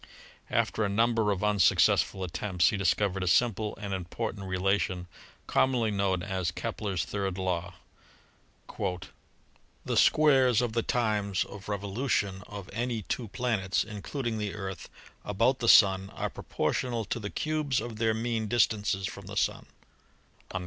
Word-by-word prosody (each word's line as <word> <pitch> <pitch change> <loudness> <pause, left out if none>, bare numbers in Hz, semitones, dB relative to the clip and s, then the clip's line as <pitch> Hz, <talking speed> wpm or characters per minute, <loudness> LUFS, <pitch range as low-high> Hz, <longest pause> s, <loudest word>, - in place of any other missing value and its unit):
After 110 - +1
a 100 - +1
number 115 +1 +2
of 100 -1 -1
unsuccess 105 -4 +4
ful 95 - -6
attempts 90 +1 +1
he - - -1
discovered 100 0 +1
a 90 - -1
simple 110 +1 +2
and 100 -2 -4
important 100 +3 -4
rela 95 +2 +1
tion 90 -1 -3 0.4
commonly 120 -4 +2
known 100 -3 0
as 95 -3 -1
Kepler's 95 -2 -3
third 95 0 -3
law: 90 -2 -2 2.1
"The - - -1
squares 135 -6 +5
of 120 -3 -1
the 115 - +1
times 105 -5 0
of 100 0 -10
revolution 100 -1 -1
of 100 -3 -8
any 120 0 -2
two 115 +5 -3
planets 105 -4 0
(including 110 +3 -4
the 105 -1 -3
Earth) 95 -2 -6 0.3
about 115 +6 +1
the 115 - +1
Sun 95 -1 +6
are - - -3
pro - - -10
portional 120 -3 -1
to 120 - -2
the 105 -2 -5
cubes 155 -3 -1
of 115 -2 -6
their 110 -1 +1
mean 115 -1 -1
distances 105 -3 +1
from 100 -1 -7
the 100 0 -6
Sun." - - 0
105 Hz, 150 wpm, -29 LUFS, 95-115 Hz, 2.1 s, Sun